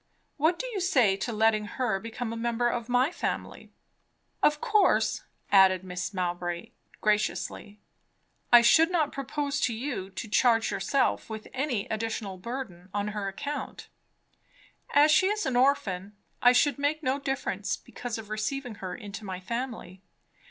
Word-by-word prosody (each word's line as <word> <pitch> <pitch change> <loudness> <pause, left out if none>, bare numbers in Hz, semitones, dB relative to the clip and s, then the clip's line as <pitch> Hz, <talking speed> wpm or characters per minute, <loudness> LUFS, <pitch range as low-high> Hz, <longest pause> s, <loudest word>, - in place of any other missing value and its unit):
What 320 +4 +2
do - - -4
you 470 -5 -3
say 255 - +3
to 215 +5 -3
letting 215 -1 +2
her 240 -7 0
become 230 +2 -5
a - - -4
member 235 +1 0
of 240 0 -2
my 250 +5 +3
family? - - -4 0.7
Of 300 0 +3
course," 425 +4 +2 0.3
added 190 -2 +6
Mrs. 180 +2 -5
Mowbray 175 -1 -3 0.3
graciously, 210 0 -1 0.7
"I 240 -1 +9
should 325 +7 +6
not 330 -5 +1
propose 285 +1 -3
to 235 - 0
you 230 -6 -4
to 195 +4 -6
charge 225 +1 +3
yourself 270 -4 0
with 220 -1 -7
any 260 -6 -1
additional 215 -3 -3
burden 190 -5 -6
on 205 0 -1
her 210 -1 -3
account. 285 +10 -5 1.0
As 295 +2 +6
she 375 +5 +5
is 420 +1 -1
an 260 - -1
orphan, 210 -7 +1 0.3
I 245 - +7
should 265 +2 +3
make 300 +2 0
no 265 +1 0
difference 255 -8 -2
because 245 -1 -6
of 215 -1 -9
receiving 245 +4 -3
her 185 -2 -4
into 210 -1 -8
my 190 -2 -5
family. 225 -3 -5
230 Hz, 150 wpm, -28 LUFS, 200-275 Hz, 1.0 s, I